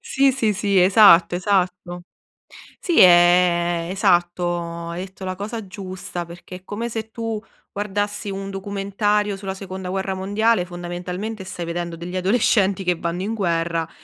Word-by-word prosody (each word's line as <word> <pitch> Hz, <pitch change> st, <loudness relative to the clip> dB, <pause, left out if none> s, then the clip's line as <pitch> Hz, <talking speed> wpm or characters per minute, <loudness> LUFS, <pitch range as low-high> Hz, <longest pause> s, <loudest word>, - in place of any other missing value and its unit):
Sì, 275 Hz, 0 st, +2 dB
sì, 230 Hz, -5 st, +1 dB
sì, 200 Hz, -1 st, +1 dB
esatto, 185 Hz, -3 st, +6 dB
esatto. 180 Hz, -1 st, -1 dB, 0.8 s
Sì, 345 Hz, -3 st, 0 dB
è 175 Hz, -1 st, +5 dB
esatto, 175 Hz, -2 st, 0 dB
hai 175 Hz, +2 st, -4 dB
detto 190 Hz, 0 st, -12 dB
la 185 Hz, 0 st, -3 dB
cosa 215 Hz, +2 st, -5 dB
giusta, 185 Hz, -3 st, -6 dB
perché 175 Hz, +2 st, -10 dB
è 180 Hz, -, -14 dB
come 225 Hz, +4 st, -4 dB
se 225 Hz, -1 st, -4 dB
tu 225 Hz, -1 st, -4 dB, 0.3 s
guardassi 205 Hz, +1 st, -3 dB
un 195 Hz, 0 st, -5 dB
documentario 200 Hz, +1 st, -1 dB
sulla 195 Hz, -1 st, -5 dB
seconda 190 Hz, -1 st, -7 dB
guerra 190 Hz, +1 st, -2 dB
mondiale, 200 Hz, +1 st, +1 dB
fondamentalmente 180 Hz, +4 st, -6 dB
stai 180 Hz, -2 st, -6 dB
vedendo 170 Hz, 0 st, -4 dB
degli 175 Hz, +2 st, -6 dB
adolescenti 195 Hz, 0 st, +2 dB
che 180 Hz, -1 st, +1 dB
vanno 170 Hz, +2 st, -3 dB
in 210 Hz, +3 st, -2 dB
guerra 170 Hz, -5 st, -1 dB
190 Hz, 145 wpm, -22 LUFS, 175-205 Hz, 0.8 s, esatto